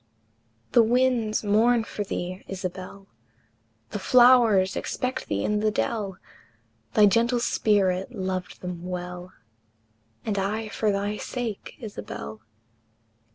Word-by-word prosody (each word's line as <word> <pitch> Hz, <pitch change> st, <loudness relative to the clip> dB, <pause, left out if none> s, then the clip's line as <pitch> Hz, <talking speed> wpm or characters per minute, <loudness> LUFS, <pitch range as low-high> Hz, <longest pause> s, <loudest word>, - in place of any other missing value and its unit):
The 240 Hz, -, +6 dB
winds 235 Hz, -2 st, +2 dB
mourn 225 Hz, +3 st, +3 dB
for 210 Hz, -, -4 dB
thee, 185 Hz, -1 st, -5 dB
Isabel, 190 Hz, +1 st, -6 dB, 0.9 s
The 205 Hz, -, -3 dB
flowers 235 Hz, -4 st, +5 dB
expect 255 Hz, +1 st, -3 dB
thee 100 Hz, 0 st, -1 dB
in 210 Hz, 0 st, +1 dB
the 215 Hz, +1 st, +2 dB
dell, 205 Hz, -3 st, -2 dB, 0.8 s
Thy 210 Hz, -, +7 dB
gentle 235 Hz, +4 st, +3 dB
spirit 195 Hz, -3 st, +1 dB
loved 185 Hz, -4 st, -4 dB
them 180 Hz, -1 st, -6 dB
well; 180 Hz, 0 st, -6 dB, 0.9 s
And 205 Hz, -2 st, -1 dB
I 215 Hz, +3 st, -2 dB
for 215 Hz, 0 st, 0 dB
thy 200 Hz, +1 st, -1 dB
sake, 235 Hz, -5 st, -5 dB
Isabel! 110 Hz, -, -7 dB
205 Hz, 110 wpm, -26 LUFS, 185-230 Hz, 0.9 s, Thy